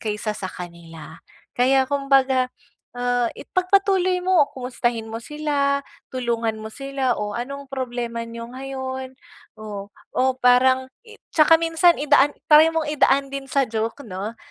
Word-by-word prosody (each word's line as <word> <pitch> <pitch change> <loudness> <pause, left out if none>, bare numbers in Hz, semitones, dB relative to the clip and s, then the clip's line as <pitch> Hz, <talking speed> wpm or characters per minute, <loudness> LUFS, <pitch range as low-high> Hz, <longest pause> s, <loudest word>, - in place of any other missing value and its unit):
kaysa 215 -1 -2
sa 195 -3 -5
kanila. 170 -3 -10 0.3
Kaya 265 +2 +3
kumbaga, 270 -2 +2 0.4
ah, 245 0 0
ipagpatuloy 370 -1 +1
mo, 360 -4 +4
kumustahin 240 -3 -2
mo 220 - -5
sila, 280 +2 -1 0.3
tulungan 230 -3 -2
mo 220 - -6
sila, 275 +1 -2
oh 210 0 -3
anong 275 +5 -5
problema 245 -3 -4
niyo 230 +1 -8
ngayon? 260 0 -6 0.4
Oh, 205 -2 -7 0.2
o 260 0 +1
parang 260 +1 +3
i 445 -2 -15 0.2
tsaka 325 0 +6
minsan 330 +1 +3
idaan, 290 0 +3
try 310 +1 +7
mong 325 -1 -1
idaan 275 -1 +2
din 275 -1 -5
sa 275 +1 +2
joke, 225 +4 -4
'no? 205 +2 -6
260 Hz, 135 wpm, -22 LUFS, 230-280 Hz, 0.4 s, try